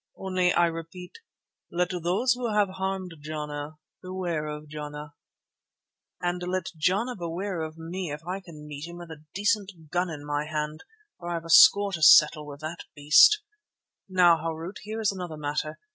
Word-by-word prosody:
Only 185 -2 +1
I 175 - +4
repeat—let 175 - -6
those 190 +9 +2
who 245 -2 -3
have 210 -2 +2
harmed 190 -1 -3
Jana 150 0 -6 0.2
beware 180 -4 -3
of 150 0 -7
Jana." 150 0 -7 1.1
"And 175 0 -2
let 180 0 -3
Jana 195 +10 0
beware 175 +1 -4
of 155 0 -6
me 170 +2 -5
if 150 +2 -7
I 185 +2 -3
can 165 -5 -12
meet 150 +1 -7
him 170 0 -9
with 175 -1 -10
a 155 -1 -11
decent 200 -6 -1
gun 180 0 0
in 150 -3 -7
my 145 0 -2
hand, 155 0 -4 0.4
for 175 - -6
I 175 - -1
have 165 0 -5
a 165 - -4
score 200 +4 +8
to 170 - -3
settle 150 0 +7
with 145 0 -10
the 155 +2 -5 0.2
beast. 155 - +6 0.7
Now, 180 -3 +5
Harût, 165 +3 -5
there 220 +2 -5
is 210 - +2
another 180 -5 -6
matter. 150 +1 -3
170 Hz, 170 wpm, -27 LUFS, 155-185 Hz, 1.1 s, score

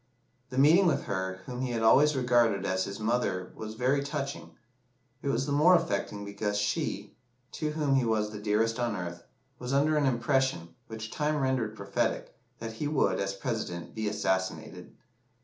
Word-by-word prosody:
The 130 - -6
meeting 165 +7 +6
with 165 - +1
her 95 -1 -3
whom 125 0 -5
he 125 -2 -2
had 115 -1 -1
always 150 +6 +5
regarded 120 -6 +2
as 95 0 0
his 100 +1 -6
mother 110 -5 -1
was 110 0 -7
very 130 +4 +1
touching; 140 0 -5 0.7
it - - -5
was 130 -1 +1
the 145 - -3
more 155 +6 +6
affecting 130 -11 -1
because 105 +1 -2
she, 105 0 -2 0.4
to 150 -1 -3
whom 150 -3 +1
he 135 -2 +3
was 110 -2 0
the 105 - -7
dearest 110 +3 +1
on 120 -3 0
earth, 85 -2 -5 0.4
was 125 +2 -4
under 150 +3 +3
an 145 -2 +2
impression, 125 - 0
which 110 0 -7
time 150 0 0
rendered 130 -6 0
prophetic, 100 -1 -2 0.2
that 115 0 -6
he 145 +6 -3
would, 135 -11 +1
as 95 0 -2
President, 100 -6 -4
be 110 -1 -3
assassinated. 95 -3 -2
115 Hz, 175 wpm, -29 LUFS, 105-135 Hz, 0.7 s, meeting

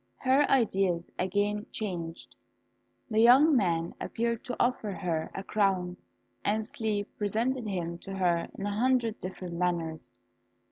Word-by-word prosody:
Her 270 - +3
ideas 195 -9 +2
again 205 +3 0
changed, 175 -6 -5 0.8
the 215 - +2
young 265 +7 +7
man 170 -7 +1
appeared 235 0 -2
to 250 -1 -3
offer 240 -4 +1
her 170 -4 -2
a 195 - -4
crown, 190 -4 +1 0.5
and 215 +1 +1
sleep 210 -2 -2
presented 230 +4 0
him 170 -3 -3
to 195 +2 -7
her 175 -3 +1
in 195 - -4
a 205 - -1
hundred 235 0 +1
different 185 -1 -6
manners. 170 -3 -1
205 Hz, 135 wpm, -29 LUFS, 180-230 Hz, 0.8 s, young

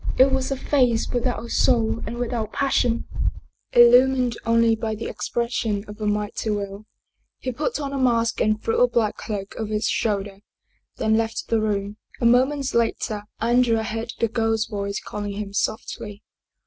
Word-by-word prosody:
It 265 +1 +6
was 265 -1 0
a 275 - -1
face 250 -5 +2
without 245 -1 -1
a - - -8
soul 230 -2 +2
and 235 +2 -5
without 235 -3 -2
passion, 250 -4 +1 0.7
illumined 245 0 +6
only 230 0 +4
by 220 0 -3
the 220 - -6
expression 230 -3 -2
of 210 +1 -10
a 210 - 0
mighty 210 +1 -1
will. 200 0 -4 0.5
He 255 - -4
put 295 +4 -2
on 280 -1 -4
a 275 - -2
mask 235 -3 +2
and 215 0 +2
threw 225 - 0
a 245 - +6
black 230 -3 0
cloak 200 -3 -5
over 215 -1 -3
his 210 +1 0
shoulder, 200 -2 -1 0.6
then 220 0 +2
left 225 0 -2
the 225 -1 +2
room. 205 -1 -2 0.2
A 235 - 0
moment 260 +3 +3
later 220 -2 0
Andrea 235 -1 +2
heard 225 +1 -4
the 230 - +2
girl's 225 -1 0
voice 200 -2 -3
calling 205 -1 -5
him 200 -1 -5
softly. 210 0 -3
225 Hz, 170 wpm, -23 LUFS, 210-245 Hz, 0.7 s, It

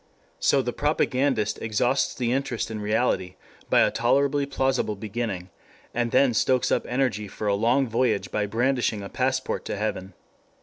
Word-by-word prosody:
So 135 - +3
the 120 - -3
propagandist 135 -6 0
exhausts 120 +5 +1
the 120 -2 -1
interest 130 -4 -2
in 110 -1 -4
reality 105 -4 0 0.3
by - - +5
a - - +3
tolerably 140 +4 +1
plausible 135 -5 0
beginning, 100 -3 -4 0.4
and 120 0 0
then 130 0 +3
stokes 130 +2 +2
up - - +1
energy 125 -5 -1
for 105 - -7
a 100 - +2
long 120 +6 +2
voyage 115 -2 0
by 105 -1 -1
brandishing 120 -1 0
a 100 - -7
passport 130 0 -1
to - - -3
heaven. 100 -2 -3
120 Hz, 160 wpm, -25 LUFS, 105-130 Hz, 0.4 s, by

